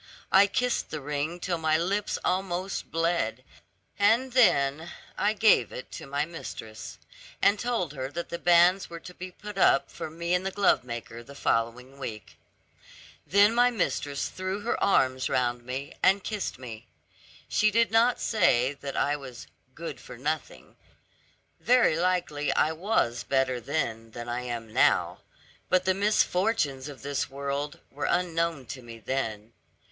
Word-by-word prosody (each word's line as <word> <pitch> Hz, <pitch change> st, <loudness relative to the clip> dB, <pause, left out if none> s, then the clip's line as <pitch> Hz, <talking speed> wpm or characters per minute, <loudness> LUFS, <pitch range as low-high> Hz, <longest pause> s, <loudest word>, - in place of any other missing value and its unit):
I 195 Hz, +1 st, +7 dB
kissed 250 Hz, +4 st, 0 dB
the 155 Hz, -, -4 dB
ring 150 Hz, +4 st, -3 dB
till 175 Hz, -2 st, -2 dB
my 155 Hz, -1 st, +2 dB
lips 200 Hz, +5 st, -1 dB
almost 185 Hz, 0 st, -2 dB
bled, 165 Hz, +1 st, 0 dB, 0.6 s
and 230 Hz, +6 st, +3 dB
then 160 Hz, -, +3 dB, 0.2 s
I 210 Hz, +1 st, +1 dB
gave 210 Hz, -, +4 dB
it 130 Hz, -, -8 dB
to -, -, -8 dB
my 140 Hz, +2 st, -1 dB
mistress, 110 Hz, -9 st, -8 dB, 0.4 s
and 205 Hz, +1 st, +3 dB
told 230 Hz, -, -1 dB
her 130 Hz, -2 st, -4 dB
that 170 Hz, +4 st, -5 dB
the 170 Hz, -, -4 dB
banns 175 Hz, +2 st, +4 dB
were 170 Hz, 0 st, -7 dB
to 180 Hz, -, -11 dB
be 185 Hz, +1 st, -7 dB
put 205 Hz, +2 st, -8 dB
up 135 Hz, -, +4 dB
for -, -, -6 dB
me 170 Hz, +2 st, -3 dB
and 180 Hz, +1 st, +2 dB
the 195 Hz, -, -1 dB
glovemaker 120 Hz, -, 0 dB
the 140 Hz, +4 st, -13 dB
following 125 Hz, +2 st, -1 dB
week. 110 Hz, -6 st, -7 dB, 0.9 s
Then 205 Hz, +3 st, +5 dB
my 245 Hz, +1 st, +5 dB
mistress 145 Hz, -, -1 dB
threw 190 Hz, +2 st, -4 dB
her 230 Hz, -, -1 dB
arms 130 Hz, -8 st, +2 dB
round 120 Hz, -1 st, 0 dB
me, 130 Hz, +3 st, -5 dB
and 195 Hz, 0 st, +4 dB
kissed 210 Hz, -, -3 dB
me. 115 Hz, -2 st, -9 dB, 0.6 s
She 215 Hz, -, +3 dB
did 230 Hz, +1 st, +2 dB
not 230 Hz, +2 st, +4 dB
say 140 Hz, -, +2 dB
that 140 Hz, -1 st, -7 dB
I 145 Hz, -, +2 dB
was 130 Hz, -, -9 dB, 0.3 s
'good 160 Hz, -6 st, -6 dB
for 125 Hz, -, -11 dB
nothing;' 150 Hz, +5 st, -4 dB, 0.8 s
very 245 Hz, -9 st, +4 dB
likely 170 Hz, -4 st, 0 dB
I 155 Hz, -, +2 dB
was 160 Hz, -, 0 dB
better 135 Hz, -2 st, 0 dB
then 115 Hz, -5 st, -2 dB
than 120 Hz, +1 st, -8 dB
I 120 Hz, +1 st, -2 dB
am 120 Hz, -3 st, -6 dB
now; -, -, +3 dB, 0.5 s
but 185 Hz, 0 st, +3 dB
the 190 Hz, -, +3 dB
misfortunes 185 Hz, -, +1 dB
of 140 Hz, -2 st, -11 dB
this 140 Hz, -1 st, -2 dB
world, 140 Hz, +1 st, -3 dB
were 145 Hz, +1 st, -3 dB
unknown 170 Hz, -5 st, 0 dB
to 130 Hz, +2 st, -7 dB
me 115 Hz, -1 st, -10 dB
then. 115 Hz, -3 st, -3 dB
155 Hz, 155 wpm, -27 LUFS, 130-190 Hz, 0.9 s, I